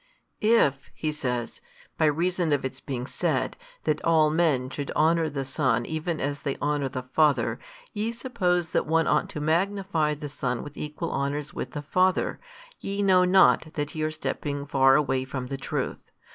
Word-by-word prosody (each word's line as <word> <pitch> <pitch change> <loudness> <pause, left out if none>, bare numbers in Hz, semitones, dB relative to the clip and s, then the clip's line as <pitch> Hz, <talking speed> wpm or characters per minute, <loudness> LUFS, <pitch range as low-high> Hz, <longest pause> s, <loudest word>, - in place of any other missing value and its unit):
|262 215 - +1
"If 140 - +3
(he 155 - -2
says) 125 -5 -3 0.3
by - - +2
reason 170 +2 +1
of 140 -2 0
its 130 0 -5
being 125 -3 -4
said, - - -1 0.3
That - - 0
all 160 -2 +4
men 150 -6 +1
should 140 +1 -4
honour 165 0 +3
the 135 -2 -3
Son 130 - +1
even 160 +1 -3
as 145 0 -2
they 140 -2 -2
honour 145 -2 0
the 130 -1 -5
Father, 150 +3 +2 0.3
ye 220 +1 -1
suppose 205 -9 -1
that - - 0
one 165 +1 +3
ought - - +1
to - - -5
magnify 165 -1 +1
the 150 0 -6
Son 125 -4 -3
with 145 0 -10
equal 150 +3 -4
honours 140 +1 -2
with - - -5
the 145 - -5
Father, 185 +5 +1 0.4
ye 200 +1 -2
know 185 -2 +5
not 180 -3 +4
that 145 -1 -3
ye 155 - -4
are 155 - +1
stepping 145 -2 -3
far 135 -1 +4
away 135 -3 +1
from 130 -1 -5
the 135 - -3
truth. 135 - -4
150 Hz, 185 wpm, -26 LUFS, 140-170 Hz, 0.4 s, know